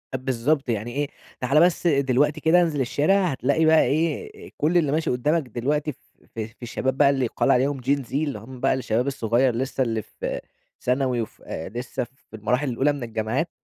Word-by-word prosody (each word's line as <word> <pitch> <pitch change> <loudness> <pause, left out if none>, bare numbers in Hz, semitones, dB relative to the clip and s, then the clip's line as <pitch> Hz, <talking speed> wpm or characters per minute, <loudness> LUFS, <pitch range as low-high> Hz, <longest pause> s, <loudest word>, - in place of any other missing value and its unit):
بالضبط، 130 +2 0
يعني 115 +1 -2
إيه 145 +2 -1 0.3
تعالَ 135 +5 +3
بس 175 0 +2
دلوقتي 140 +1 +2
كده 175 +3 +5
انزل 155 -5 0
الشارع، 170 +10 +2
هتلاقي 140 +5 +1
بقى 160 0 +6
إيه 420 - -2
كل 165 +4 +2
اللي 150 -5 +2
ماشي 160 +2 0
قدّامك 150 +7 +1
دلوقتي 150 +6 -1 0.4
في 110 -1 -3
في 115 +3 -23
الشباب 130 +3 -2
بقى 140 -1 +6
اللي 135 -2 +1
يُقال 115 - +1
عليهم 135 +1 +2
Gen 140 +3 +1
Z - - -13
اللي 145 -1 -1
هُم 130 +2 -11
بقى 135 +1 +2
الشباب 125 0 0
الصغير 120 -1 +1
لسه 130 +1 -1
اللي 115 -2 -1
في - - -5 0.4
ثانوي 125 -1 +1
وف 110 - -8
لسه 120 +9 -4
في 130 -2 -15
المراحل 125 +6 0
الأولى 135 +5 +2
من 140 - -6
الجامعات، 115 +8 -2
135 Hz, 185 wpm, -24 LUFS, 120-150 Hz, 0.4 s, بقى